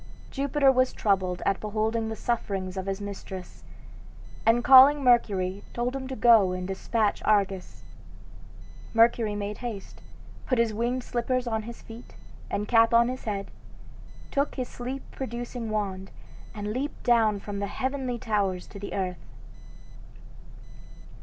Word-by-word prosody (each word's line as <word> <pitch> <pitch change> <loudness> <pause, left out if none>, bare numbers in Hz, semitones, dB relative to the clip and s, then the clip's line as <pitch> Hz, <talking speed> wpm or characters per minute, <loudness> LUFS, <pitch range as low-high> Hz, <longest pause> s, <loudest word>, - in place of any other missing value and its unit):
Jupiter 280 0 +3
was 255 0 +2
troubled 185 -3 0
at 195 - +1
beholding 220 +1 -1
the 220 - -4
sufferings 195 -6 -2
of 190 0 -4
his 195 0 -2
mistress, 195 -2 -8 0.8
and 235 +1 +4
calling 270 +3 +8
Mercury 200 -6 +2
told 245 +2 -1
him 265 -1 -5
to 265 - -5
go 215 -5 +5
and 185 0 -4
despatch 205 +2 -1
Argus. 195 -3 0 1.1
Mercury 225 -2 +3
made 205 0 -4
haste, 230 -6 -7 0.5
put 255 - +1
his 230 -2 +2
winged 240 +3 -1
slippers 250 +1 -1
on 220 -2 -1
his 235 +2 -10
feet, 230 +2 -12 0.3
and 205 +1 -2
cap 230 0 +4
on 235 +1 +5
his 255 0 -6
head, 200 -2 -3 0.8
took 280 +1 0
his 255 -2 -3
sleep 255 +3 -6
producing 240 -2 -5
wand, 195 -3 -3 0.5
and 210 0 -4
leaped 275 +5 -4
down 225 -4 +3
from 200 0 -6
the 200 - -2
heavenly 260 +1 -3
towers 205 -6 -1
to 200 - -11
the 200 - -6
earth. 185 -3 -3
225 Hz, 140 wpm, -27 LUFS, 200-245 Hz, 1.1 s, calling